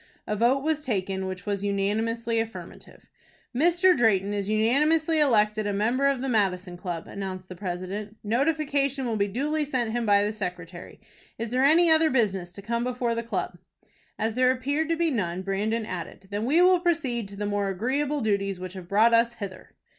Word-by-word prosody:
A 210 - -2
vote 245 +5 +2
was 310 -1 0
taken 190 -5 -2
which 185 0 -6
was 200 -1 -2
unanimously 225 +3 0
affirmative. 225 0 -8 0.5
"Mr. 350 +6 +4
Drayton 205 - +2
is 200 -1 -2
unanimously 300 +9 +2
elected 215 -6 +3
a 205 - -1
member 235 +7 +1
of 275 -2 0
the - - -2
Madison 190 -6 0
Club," 175 -2 -5
announced 190 -2 -6
the 185 - -7
president. 190 +3 -5
"Notification 275 +3 0
will 230 -2 -1
be 200 -1 +1
duly 295 +9 -1
sent 255 -6 -1
him 235 -1 -2
by 200 0 +5
the 210 +1 -1
secretary. 180 -4 -7 0.4
Is 230 0 -4
there 255 +1 +2
any 325 +4 +5
other 320 0 +5
business 195 - 0
to 200 - -11
come 235 +3 -1
before 245 -1 -1
the 230 - -2
club?" 230 0 -4 0.6
As 220 0 -1
there 255 +2 +3
appeared 285 +5 0
to 330 - +1
be 335 -1 +1
none, 185 -7 -2
Brandon 215 +4 -1
added, 185 +1 -7
"Then 205 +2 -2
we 320 +8 +4
will 365 0 +5
proceed 280 - -1
to 200 - -11
the 205 +1 -3
more 205 -1 -1
agreeable 270 +9 -1
duties 200 -3 0
which 185 0 -7
have 185 -3 -9
brought 220 +4 +4
us 230 +1 +3
hither." 195 -4 -9
225 Hz, 190 wpm, -26 LUFS, 200-270 Hz, 0.6 s, by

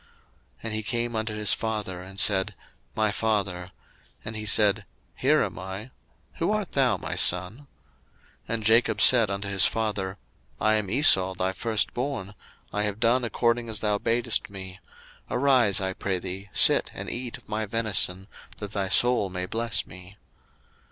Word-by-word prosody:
01:027:018 - - -30 0.5
And 115 -1 -3
he 110 - -1
came 120 +1 -3
unto 110 -1 -3
his 105 -3 +2
father, 105 -5 -4
and 95 +1 -8
said, 95 -1 +4 0.4
My 110 -1 +1
father: 100 -5 -2 0.6
and 110 - -6
he 110 0 -5
said, 105 -1 +3 0.3
Here - - +2
am - - -5
I; 95 +6 -8 0.5
who 165 - -1
art 215 -4 -2
thou, 135 -3 +2
my - - -5
son? 90 +2 +3
01:027:019 145 +3 -17 0.8
And 115 -1 -3
Jacob 110 0 +3
said 115 -4 +6
unto 100 0 -4
his 100 -1 +5
father, 100 -4 -3 0.4
I 110 0 +2
am 105 -3 -1
Esau 95 -7 +5
thy 95 +1 -1
first 110 +2 0
born; 120 -6 -4 0.4
I 105 - -1
have 105 0 -2
done 120 +2 +2
according 120 0 -1
as 110 -2 -2
thou 105 -1 +1
badest 115 +1 0
me: 95 -1 -8 0.5
arise, 125 -7 +3
I 95 -1 -2
pray 95 0 -3
thee, 95 +2 -6
sit - - +4
and - - -5
eat 120 -1 -4
of - - -23
my 110 0 -3
venison, 100 -4 0 0.3
that 105 -2 -7
thy 100 -2 -3
soul 120 -1 +2
may 90 0 -4
bless 115 +3 -2
me. 90 +4 -13
105 Hz, 170 wpm, -25 LUFS, 95-115 Hz, 0.8 s, said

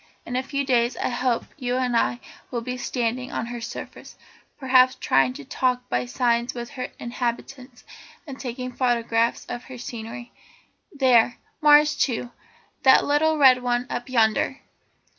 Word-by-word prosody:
In 245 - -5
a 255 - +1
few 280 +1 -3
days 245 -2 +1
I - - -1
hope 245 -1 0
you 250 -3 -2
and 250 -2 0
I 235 +1 +1 0.3
will 240 -2 -3
be 250 +2 -4
standing 250 0 -3
on - - -3
her 240 0 -6
surface, 235 - -8 0.4
perhaps 255 -1 +4
trying 130 -2 +2
to 140 - -10
talk 250 - -1
by 125 0 -1
signs 235 - 0
with 240 0 -6
her 255 - -5
inhabitants, 245 +1 -5 0.4
and 275 -4 -9
taking 255 0 -5
photographs 235 -2 0
of 240 - -7
her 260 - -10
scenery. 235 0 -8 0.6
There's 255 -6 +4 0.3
Mars 295 0 +6
too, 245 -2 -1 0.5
that 265 - +6
little 310 +2 +2
red 260 -3 +6
one 245 0 0
up 245 +2 -4
yonder. 230 +2 +1
245 Hz, 155 wpm, -24 LUFS, 235-260 Hz, 0.6 s, Mars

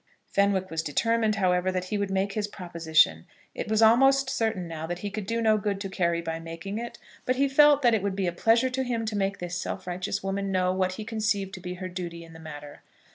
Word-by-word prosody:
Fenwick 195 -2 +1
was 160 0 -1
determined, 220 +8 +1
however, 185 -2 +1
that 185 -1 -2
he 195 +3 -3
would 200 -1 -1
make 195 +1 0
his 210 -1 -1
proposition. 160 - +1 0.3
It - - -5
was 220 +1 +3
almost 270 +4 +5
certain 220 -6 -1
now 160 -1 -5
that 175 +1 -3
he 205 - -3
could 205 -1 -5
do 230 +1 -1
no 215 -1 +4
good 200 -1 -2
to 195 - -4
Carry 170 -2 0
by 165 -1 -3
making 165 +6 -6
it; 235 0 -6 0.3
but 255 - 0
he 275 +2 +2
felt 290 +1 +5
that 240 -2 +5
it 220 - +2
would 200 -1 -2
be 195 -1 -1
a 175 - 0
pleasure 230 +8 +2
to 265 +1 -1
him 235 -3 -2
to 215 -1 -3
make 195 -1 0
this 175 0 -4
self - - -5
righteous 185 +2 -3
woman 195 0 -2
know 185 -1 +1
what 185 0 0
he 215 +3 -7
conceived 210 -3 -1
to - - -7
be 180 0 -6
her 185 +1 -5
duty 175 -2 -6
in 165 0 -14
the 160 - -12
matter. 145 -2 -10
195 Hz, 245 wpm, -27 LUFS, 175-220 Hz, 0.3 s, almost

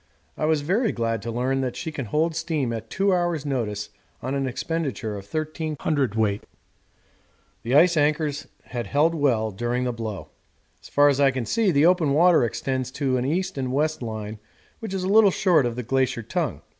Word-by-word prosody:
I - - -2
was 155 -1 +2
very 200 - +1
glad 115 -2 -2
to 115 - -4
learn 130 +3 0
that 125 -2 -3
she 165 -2 -4
can 140 -4 -5
hold 155 +8 0
steam 155 -7 -1
at 115 0 -6
two 195 0 +1
hours' 175 -4 0
notice 110 -7 -2 0.3
on 130 - -4
an 135 -1 -1
expenditure 130 -5 -3
of 100 -1 -9
13 155 +2 -3
cwt. 110 -9 0 1.2
The 120 +4 -1
ice 170 +3 +6
anchors 150 -1 0 0.2
had 120 -3 -5
held 150 +8 +2
well 120 -8 +1
during 120 +5 -2
the 125 -1 -1
blow. 110 -4 -6 0.5
As - - -14
far 145 0 +5
as 140 -1 +2
I 140 -1 +5
can 130 -3 -3
see 225 - +1
the 150 -3 +4
open 170 -5 +3
water 170 0 +5
extends 130 +2 -2
to 135 -3 0
an 125 - -1
east 180 +2 -1
and 130 -1 -2
west 155 +3 0
line 110 -2 -5 0.4
which 220 -4 -5
is 190 - -2
a - - -1
little 210 +1 +6
short 175 -8 +3
of 120 - -4
the 125 - -4
glacier 130 -1 0
tongue. - - -3
140 Hz, 195 wpm, -24 LUFS, 120-160 Hz, 1.2 s, ice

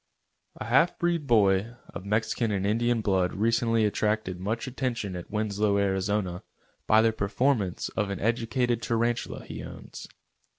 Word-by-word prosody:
A - - -6
half 135 +10 +3
breed 170 -4 0
boy 105 0 +3
of 95 - -8
Mexican 110 +2 0
and 100 -1 -1
Indian 115 +2 +1
blood 95 -3 +1
recently 115 +1 +2
attracted 105 -3 -1
much 110 +5 -2
attention 120 -7 -3
at 90 - -7
Winslow, 105 -1 0
Ariz., 95 -2 0 0.5
by 110 +1 +5
the 115 -1 +3
performances 105 -2 0
of 105 -2 -2
an 100 - -3
educated 115 +1 0
tarantula 120 +1 -1
he - - -7
owns. - - -9
110 Hz, 140 wpm, -27 LUFS, 100-115 Hz, 0.5 s, by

